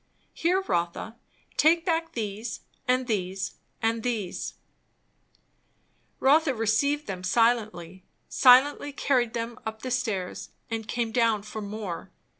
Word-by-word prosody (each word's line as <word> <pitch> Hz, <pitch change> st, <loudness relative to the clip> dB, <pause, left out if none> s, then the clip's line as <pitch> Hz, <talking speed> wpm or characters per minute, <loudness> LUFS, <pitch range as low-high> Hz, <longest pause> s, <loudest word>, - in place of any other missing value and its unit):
Here, 360 Hz, +3 st, +1 dB
Rotha 175 Hz, -, -2 dB, 0.4 s
take 330 Hz, +2 st, +4 dB
back 330 Hz, -1 st, 0 dB
these, 220 Hz, 0 st, -4 dB, 0.3 s
and 255 Hz, +1 st, +2 dB
these, 190 Hz, -4 st, -2 dB, 0.3 s
and 225 Hz, 0 st, +1 dB
these 220 Hz, -7 st, -3 dB, 0.8 s
" -, -, -42 dB
Rotha 285 Hz, +1 st, +4 dB
received 230 Hz, +7 st, +1 dB
them 185 Hz, -2 st, -5 dB
silently; 210 Hz, -5 st, +1 dB, 0.2 s
silently 275 Hz, +3 st, +5 dB
carried 250 Hz, -5 st, +1 dB
them 230 Hz, 0 st, -4 dB
up 220 Hz, +2 st, -6 dB
stairs 220 Hz, -8 st, -2 dB, 0.2 s
and 225 Hz, -1 st, -3 dB
came 235 Hz, -2 st, -1 dB
down 225 Hz, -3 st, +2 dB
for 215 Hz, +1 st, -6 dB
more. 205 Hz, -4 st, -5 dB
230 Hz, 115 wpm, -27 LUFS, 210-255 Hz, 0.8 s, silently